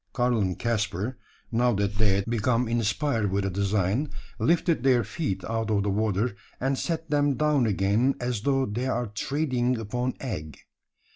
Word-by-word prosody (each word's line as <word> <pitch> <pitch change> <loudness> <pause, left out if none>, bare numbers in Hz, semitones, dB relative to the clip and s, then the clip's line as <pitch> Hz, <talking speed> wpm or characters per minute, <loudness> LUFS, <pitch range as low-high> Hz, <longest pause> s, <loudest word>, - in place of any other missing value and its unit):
Karl 120 -2 +2
and 95 -3 0
Caspar 110 0 -1 0.3
now 120 +1 +3
that 100 0 -1
they 105 -3 +4
had 100 0 0
become 120 +1 +1
inspired 115 -1 0
with 100 0 0
a 95 - -1
design 100 +7 0 0.3
lifted 170 -2 +2
their 125 -2 +4
feet 110 - -3
out 115 -1 -2
of 100 -2 +2
the 100 - 0
water, 105 +2 0 0.2
and 135 +2 +1
set 160 +2 -3
them 145 -1 +3
down 150 -5 +2
again, 105 +6 +2
as 125 -4 -2
though 135 +2 +2
they 120 +3 -2
ere 120 -4 -1
treading 130 0 0
upon 125 +3 -2
egg. 80 - -5
115 Hz, 165 wpm, -27 LUFS, 100-130 Hz, 0.3 s, they